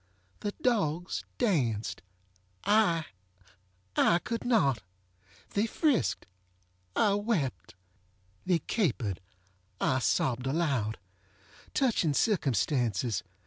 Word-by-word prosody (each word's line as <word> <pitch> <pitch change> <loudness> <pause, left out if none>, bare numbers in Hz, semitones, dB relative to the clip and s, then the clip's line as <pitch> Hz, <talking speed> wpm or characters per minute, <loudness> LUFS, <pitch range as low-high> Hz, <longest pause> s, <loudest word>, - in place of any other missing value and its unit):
The 205 -1 -3
dogs 180 -8 0
danced! 130 - 0 0.6
IŌĆöI 205 -6 +4 1.2
could 230 -1 -3
not! 140 - +3 0.7
They 205 +3 +1
friskedŌĆöI 90 - -1
wept. 145 - -1 0.7
They 180 -2 +3
caperedŌĆöI 100 - -2
sobbed 125 0 +1
aloud. 135 -8 0 0.8
Touching 210 - +2
circumstances! 125 - +1
135 Hz, 65 wpm, -30 LUFS, -, 1.2 s, IŌĆöI